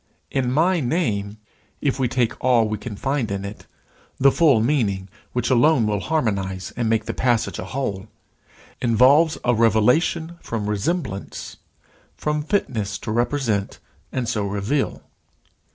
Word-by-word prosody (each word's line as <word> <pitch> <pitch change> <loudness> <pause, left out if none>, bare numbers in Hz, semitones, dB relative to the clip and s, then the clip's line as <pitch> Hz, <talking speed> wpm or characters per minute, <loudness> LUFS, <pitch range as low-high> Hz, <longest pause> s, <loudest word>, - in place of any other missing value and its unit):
In 130 -2 0
my 170 +6 +3
name, 110 - -1 0.4
if 140 -2 -1
we 130 - +2
take 120 -1 0
all 120 -3 +4
we 105 -1 -3
can 105 -1 -6
find 135 0 -1
in 100 0 -3
it, 100 +1 -9 0.5
the 140 +1 +6
full 145 -8 +4
meaning 110 -7 0 0.2
which 125 +2 -1
alone 130 0 +4
will 105 -1 0
harmonize 100 -11 -2
and 115 -2 -1
make 110 -1 +1
the - - -3
passage 120 -3 0
a - - -4
whole, 100 -8 -3 0.7
involves 130 +7 +4
a 125 - +3
revelation 125 - +2
from 110 -3 -4
resemblance, 105 - -3 0.6
from 150 0 -1
fitness 115 - -1
to 110 - -5
represent 120 -3 0 0.3
and 125 -2 -2
so 105 -4 -1
reveal. 105 +8 -1
120 Hz, 140 wpm, -22 LUFS, 105-140 Hz, 0.7 s, the